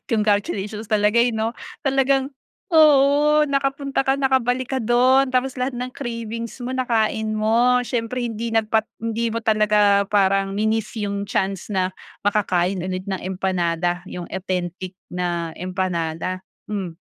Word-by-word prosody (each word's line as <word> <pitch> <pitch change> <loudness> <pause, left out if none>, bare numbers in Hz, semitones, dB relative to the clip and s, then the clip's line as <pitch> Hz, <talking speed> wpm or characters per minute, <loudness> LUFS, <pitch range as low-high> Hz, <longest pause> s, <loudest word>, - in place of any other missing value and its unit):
congratulations 210 -1 0
talaga, 210 +1 +3
eh 240 +1 +3
'no. 220 +1 -1 0.3
Talagang 270 0 +2 0.4
oo 300 0 +5
nakapunta, 275 0 0
ka 270 0 +1
nakabalik 260 -1 +1
ka 260 - 0
do'n, 255 +3 +4
tapos 255 +1 0
lahat 255 0 -2
ng 250 0 -4
cravings 230 -2 -5
mo 250 - -3
nakain 220 -3 0
mo. 235 +4 +3
Siyempre 240 +1 -2
hindi 230 0 -3
nagpat 220 0 +2
hindi 230 +1 -1
mo 230 - -2
talaga 210 -2 +3
parang 195 -1 +2
mi-niss 220 +1 0
'yung 200 0 -3
chance 195 -4 -1
na 185 -2 0 0.3
makakain 190 -3 +1
ulit 185 0 -4
ng 190 -2 -3
empanada 175 -2 -1
'yung 175 -1 -6
authentic 185 -1 -4 0.2
na 175 -2 -2
empanada 180 -1 -3 0.3
mm. 185 -6 -4
215 Hz, 135 wpm, -22 LUFS, 190-250 Hz, 0.4 s, oo